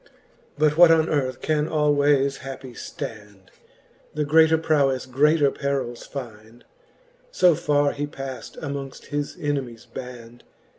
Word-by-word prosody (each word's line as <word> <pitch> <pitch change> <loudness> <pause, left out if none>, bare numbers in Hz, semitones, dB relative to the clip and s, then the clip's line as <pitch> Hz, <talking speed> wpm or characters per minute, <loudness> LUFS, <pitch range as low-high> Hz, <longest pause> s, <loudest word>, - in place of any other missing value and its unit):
But 150 0 +2
what 175 -1 +8
on 160 -1 +4
earth 130 -4 -1
can 155 -1 0
alwayes 145 -3 +2
happie 130 -1 -8
ftand? 105 -5 -9 0.6
The 150 -1 0
greater 160 +2 +5
proweile 140 -5 +1
greater 145 +2 +3
perils 135 -4 -3
find. 115 -3 -9 0.6
So 180 - +4
farre 145 -1 +1
he 145 +1 -3
paft 135 -2 -8
amongft 140 -2 -6
his 145 0 -3
enemies 135 -6 -3
band. 120 -2 -10
140 Hz, 120 wpm, -23 LUFS, 130-150 Hz, 0.6 s, what